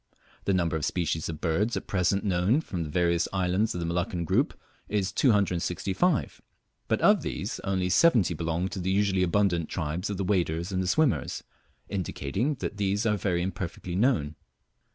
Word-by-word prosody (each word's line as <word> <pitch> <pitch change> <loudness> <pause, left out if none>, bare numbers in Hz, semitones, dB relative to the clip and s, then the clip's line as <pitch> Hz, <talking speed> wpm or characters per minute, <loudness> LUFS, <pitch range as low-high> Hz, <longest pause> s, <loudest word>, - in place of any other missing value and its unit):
The 100 - +2
number 85 -2 +1
of 80 - -2
species 80 -1 -1
of 80 -1 -6
birds 95 +8 +1
at - - -5
present 95 +1 +1
known 95 - +2
from 90 - -5
the 80 - -4
various 85 +1 +1
islands 95 +3 0
of - - -2
the - - -2
Molluccan 85 0 -1
group - - +1 0.3
is 100 -3 0
265, 100 - +1 0.5
but - - +1
of - - +5
these - - -4
only 95 -1 -1
70 105 - +4
belong 85 +2 -1
to 95 - -5
the 90 +1 -2
usually 95 -1 +2
abundant 90 -2 +1
tribes 85 +3 -3
of 100 - -3
the 100 - -1
waders 85 -2 0
and 95 -1 -1
swimmers, 155 +2 +1 0.4
indicating 100 - -2
that 115 -5 -5
these 100 +2 0
are 105 -2 +3
very 90 -3 0
imperfectly 90 -1 -4
known. 90 - +2
95 Hz, 170 wpm, -27 LUFS, 85-100 Hz, 0.5 s, of